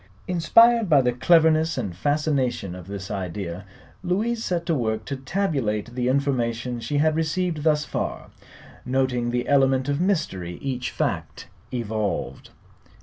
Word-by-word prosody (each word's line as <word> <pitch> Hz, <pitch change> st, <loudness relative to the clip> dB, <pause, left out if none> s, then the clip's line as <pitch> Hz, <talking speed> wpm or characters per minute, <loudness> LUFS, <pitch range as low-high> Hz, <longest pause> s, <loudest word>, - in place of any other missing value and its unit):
Inspired 225 Hz, +6 st, +5 dB
by 145 Hz, -4 st, +6 dB
the 125 Hz, -, +2 dB
cleverness 160 Hz, +3 st, +3 dB
and 100 Hz, -9 st, -3 dB
fascination 135 Hz, -, 0 dB
of 90 Hz, -1 st, -10 dB
this 100 Hz, -1 st, -6 dB
idea, 95 Hz, -1 st, -4 dB, 0.4 s
Louise 220 Hz, +6 st, 0 dB
set 170 Hz, -2 st, -1 dB
to 170 Hz, -, +1 dB
work 110 Hz, -5 st, -1 dB
to 140 Hz, -, -3 dB
tabulate 130 Hz, -, -2 dB
the 125 Hz, 0 st, -1 dB
information 125 Hz, -3 st, 0 dB
she 145 Hz, +5 st, -2 dB
had 155 Hz, +1 st, +3 dB
received 165 Hz, 0 st, -1 dB
thus 150 Hz, -1 st, +2 dB
far, -, -, -4 dB, 0.5 s
noting 125 Hz, -2 st, 0 dB
the; 120 Hz, 0 st, -1 dB
element 135 Hz, -1 st, +3 dB
of 145 Hz, +3 st, 0 dB
mystery 95 Hz, -, -1 dB
each 130 Hz, -2 st, -3 dB
fact -, -, -3 dB, 0.2 s
evolved. 110 Hz, -4 st, -3 dB
135 Hz, 140 wpm, -24 LUFS, 115-160 Hz, 0.5 s, by